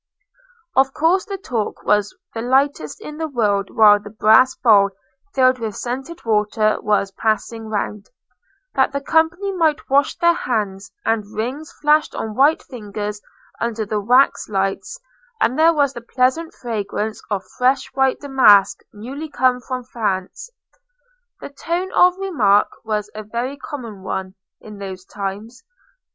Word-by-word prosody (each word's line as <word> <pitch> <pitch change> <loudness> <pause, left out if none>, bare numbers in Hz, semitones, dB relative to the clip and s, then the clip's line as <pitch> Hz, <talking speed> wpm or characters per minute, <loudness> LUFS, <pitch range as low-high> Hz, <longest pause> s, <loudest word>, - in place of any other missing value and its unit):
Of 265 0 +3
course 350 +5 +2
the 400 -2 -5
talk 240 - -4
was 210 - +1 0.2
the 225 - -4
lightest 260 - 0
in 300 0 -8
the 320 0 -2
world 205 -7 0
while 210 -2 +6
the 210 - -11
brass 220 +4 +4
bowl 205 -4 +5 0.5
filled 255 -1 +4
with 220 -3 -4
scented 270 +7 -6
water 215 0 +1
was 205 -2 +1
passing 220 +2 -2
round, 210 -1 -3 0.6
that 265 0 +2
the 280 - -1
company 325 +7 +1
might 320 -7 0
wash 280 +1 +3
their 340 0 +4
hands, 200 - -3
and 215 -2 -1
rings 265 +8 -4
flashed 300 +1 +1
on 220 - -4
white 285 +7 +3
fingers 210 -3 -6 0.4
under 225 -1 -2
the 210 +1 -2
wax 250 +5 +3
lights, 195 - -2 0.4
and 255 - +1
there 325 +1 +6
was 285 -4 +1
the 240 - -8
pleasant 260 +7 0
fragrance 220 -2 -4
of 200 -3 -2 0.2
fresh 260 +2 +3
white 265 0 +1
damask 215 -9 +5
newly 265 +9 -7
come 255 -3 +1
from 255 0 -5
France. 215 - -3 0.9
The - - -7
tone 340 +6 -3
of 360 0 +4
remark 235 - +2
was 210 -1 -3
a 215 - -6
very 235 +6 -4
common 240 -8 -8
one 190 0 -4 0.3
in 210 -2 -12
those 190 -2 -7
times. 205 +6 -6
235 Hz, 145 wpm, -20 LUFS, 210-280 Hz, 0.9 s, while